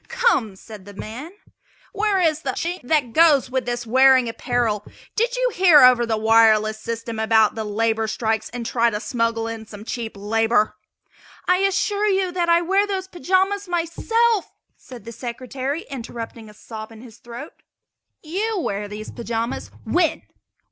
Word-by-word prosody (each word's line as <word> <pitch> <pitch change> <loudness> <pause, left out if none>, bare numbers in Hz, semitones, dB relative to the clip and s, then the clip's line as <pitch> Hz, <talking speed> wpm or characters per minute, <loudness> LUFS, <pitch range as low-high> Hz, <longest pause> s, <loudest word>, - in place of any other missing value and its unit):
"Come!" 265 - +1
said 205 0 -12
the 205 0 -12
man, 245 - -7 0.6
"where 405 -1 +1
is 315 -3 +1
the 265 -3 -2
Chink 345 +6 -3
that 250 -3 0
goes 300 -6 +4
with 260 -2 -2
this 240 0 -3
wearing 260 +1 +5
apparel? 230 -3 -1 0.3
Did 475 +3 +1
you - - +1
hear 350 -5 +6
over 245 -2 +6
the 220 -1 0
wireless 220 -1 +4
system 230 0 -5
about 220 -1 +3
the 220 - -4
labor 220 +1 0
strikes 220 0 -1
and 245 -1 -6
try 235 0 +2
to 210 -2 -3
smuggle 230 -1 -1
in 225 -1 -7
some 205 0 -11
cheap 225 -3 -5
labor?" 215 +1 +1 0.7
"I 365 - +4
assure 390 +2 +1
you 380 -2 +1
that 350 -1 -1
I 340 0 +4
wear 390 +4 +2
those 380 -2 -3
pajamas 380 +2 0
myself!" 390 +6 0 0.2
said 250 -3 -13
the 230 - -7
Secretary, 255 +5 -5
interrupting 230 -3 -8
a - - -14
sob 220 0 -9
in 225 -1 -13
his 235 -2 -14
throat. 240 +5 -9 0.7
"You 400 +7 -2
wear 205 - -3
these 210 +1 -8
pajamas? 230 +1 -4 0.2
When? 345 -3 +1
245 Hz, 160 wpm, -22 LUFS, 225-345 Hz, 0.7 s, hear